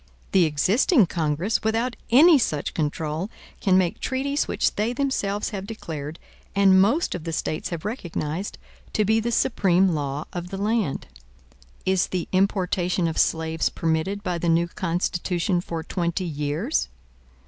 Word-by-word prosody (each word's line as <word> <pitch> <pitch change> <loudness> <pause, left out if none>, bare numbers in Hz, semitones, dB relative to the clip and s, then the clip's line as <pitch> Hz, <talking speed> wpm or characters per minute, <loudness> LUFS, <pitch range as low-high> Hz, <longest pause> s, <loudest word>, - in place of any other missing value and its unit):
The 185 -3 +5
existing 200 - +3
Congress, 165 +4 -1
without 230 +2 0
any 295 +5 +7
such 150 - -1
control, 155 +3 -2 0.3
can 190 -3 +3
make 180 -2 +1
treaties 280 +2 -1
which - - 0
they 215 +4 0
themselves 225 -7 -1
have 195 -2 -5
declared, 160 -8 -6 0.4
and 195 -1 +6
most 235 - +2
of 180 - -5
the 165 - -4
States 155 0 -2
have 170 0 -5
recognized, 180 - -4 0.4
to 215 - +2
be 220 +2 +3
the 235 +2 -1
supreme 190 -4 +3
law 145 -3 -2
of 175 0 -5
the 195 - -5
land. 210 -6 0 0.8
Is 190 -1 +2
the 180 -2 -3
importation 185 -2 +1
of 160 - -2
slaves 160 0 +1
permitted 165 +5 -1
by 180 -3 -2
the 170 - 0
new 170 +1 +3
Constitution 175 0 -1
for 165 -2 -5
twenty 170 +2 -2
years? 150 - -1
185 Hz, 150 wpm, -24 LUFS, 165-210 Hz, 0.8 s, any